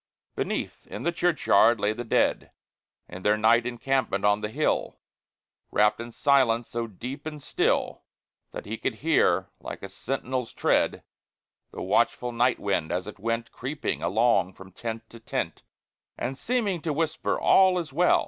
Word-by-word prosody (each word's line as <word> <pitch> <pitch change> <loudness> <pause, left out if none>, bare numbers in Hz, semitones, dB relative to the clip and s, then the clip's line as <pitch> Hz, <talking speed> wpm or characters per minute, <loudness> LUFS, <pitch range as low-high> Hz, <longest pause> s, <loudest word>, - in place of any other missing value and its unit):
Beneath, - - -3
in - - -7
the 170 - +1
churchyard, 155 -10 +3
lay 105 +1 +1
the 120 +2 -5
dead, 115 - +1 0.6
In 90 +1 -9
their 105 +2 +3
night 115 +3 +4
encampment 125 -4 -1
on 105 0 +3
the 105 - -2
hill, - - -1 0.7
Wrapped 105 +1 +3
in 120 0 -6
silence 120 -3 +2
so 115 0 -3
deep 130 +8 -7
and 150 -1 -6
still - - 0 0.5
That - - -7
he 110 +2 -5
could - - -2
hear, 95 - +3
like - - -8
a 95 - -6
sentinel's 130 +2 -3
tread, - - +1 0.7
The - - -7
watchful 125 0 +1
night 120 +1 +2
wind, 95 -6 -1
as 90 0 -1
it 105 0 -9
went 115 +2 -2
Creeping 140 +4 -4
along 110 -3 +2
from 95 +1 -13
tent 115 +3 -6
to 115 - -12
tent, 115 - -3 0.6
And 130 +2 -3
seeming 210 - -1
to 155 -1 -1
whisper, 160 +1 -1
"All 190 -1 +5
is 165 -5 -4
well!" 175 +4 +4
120 Hz, 160 wpm, -26 LUFS, 105-140 Hz, 0.7 s, All